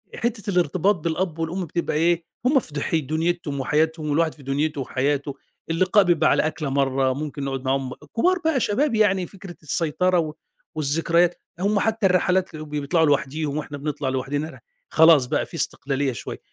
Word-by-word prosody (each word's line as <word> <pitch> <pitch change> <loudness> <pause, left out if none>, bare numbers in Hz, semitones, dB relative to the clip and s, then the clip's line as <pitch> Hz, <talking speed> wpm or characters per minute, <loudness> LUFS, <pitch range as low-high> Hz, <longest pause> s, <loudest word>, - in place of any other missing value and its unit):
حتة 225 -3 -2
الارتباط 180 +2 +2
بالأب 165 0 -2
والأم 170 +3 -2
بتبقى 170 0 -2
إيه، 170 +1 +2 0.2
هم 270 +2 +5
في 160 - -12
دح 145 +3 -1
دنيتهم 160 0 -1
وحياتهم 155 +3 0
والواحد 160 +2 +1
في 145 - -16
دنيته 145 +2 -1
وحياته، 140 +2 -1 0.3
اللقاء 185 +5 +4
بيبقى 175 -4 +3
على - - +3
أكلة 155 -2 -3
مرّه 135 -1 +1
ممكن 145 +1 -5
نقعد 135 -1 -4
معاهم 130 -1 -1 0.2
كبار 365 +9 +3
بقى 320 -4 +2
شباب 250 +4 +1
يعني 195 -4 +3
فكرة 195 -3 -11
السيطرة 175 +4 +1
و 155 -2 -2 0.4
والذكريات، 165 +4 +1 0.2
هم 200 +2 +2
حتى 220 0 0
الرحلات 185 -1 +2
ب 155 -1 -8
بيطلعوا 150 +3 +1
لوحديهم، 145 +1 0
وإحنا 150 -1 -5
بنطلع 145 -1 -3
لوحدنا 140 +4 -2
رح - - -13 0.3
خلاص 160 -5 +6
بقى - - 0
في - - -21
استقلالية 135 0 -1
شوية، 120 - -7
160 Hz, 165 wpm, -23 LUFS, 145-180 Hz, 0.4 s, خلاص